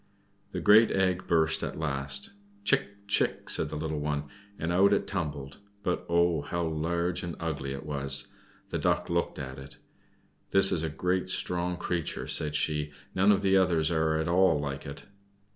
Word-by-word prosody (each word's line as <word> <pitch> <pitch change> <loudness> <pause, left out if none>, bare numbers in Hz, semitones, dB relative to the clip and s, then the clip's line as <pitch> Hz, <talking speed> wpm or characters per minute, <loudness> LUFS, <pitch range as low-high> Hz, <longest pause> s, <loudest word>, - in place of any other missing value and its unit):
The - - -4
great 110 +2 +7
egg 95 -1 0
burst 80 -2 +2
at - - -4
last. 80 - -1 0.3
"Chick! 100 - -1
chick!" 100 - 0
said 80 - 0
the 75 - -6
little 80 0 -3
one, 75 0 -2 0.3
and 80 +2 -2
out 100 +3 +4
it 100 - +1
tumbled 75 -7 -4 0.2
but, 90 - -2
oh! 85 -2 +2
how 85 +4 -3
large 85 +2 -1
and 85 -2 -5
ugly 75 -5 -3
it 70 +2 -6
was! 70 -2 +2 0.4
The - - -2
Duck - - 0
looked - - -1
at 65 -1 -6
it. 70 +2 -11 0.7
"That 95 0 +5
is 80 - +1
a 80 - -2
great, 90 +4 -1
strong 90 -1 -1
creature," 85 -3 -3
said 75 -1 +1
she. 75 0 0 0.2
"None 95 +2 +4
of 100 - +2
the 95 0 +3
others 85 -4 +3
are 80 -1 +1
at 80 +1 -1
all 85 -3 +3
like 70 0 -5
it. 70 - -8
80 Hz, 175 wpm, -28 LUFS, 75-90 Hz, 0.7 s, great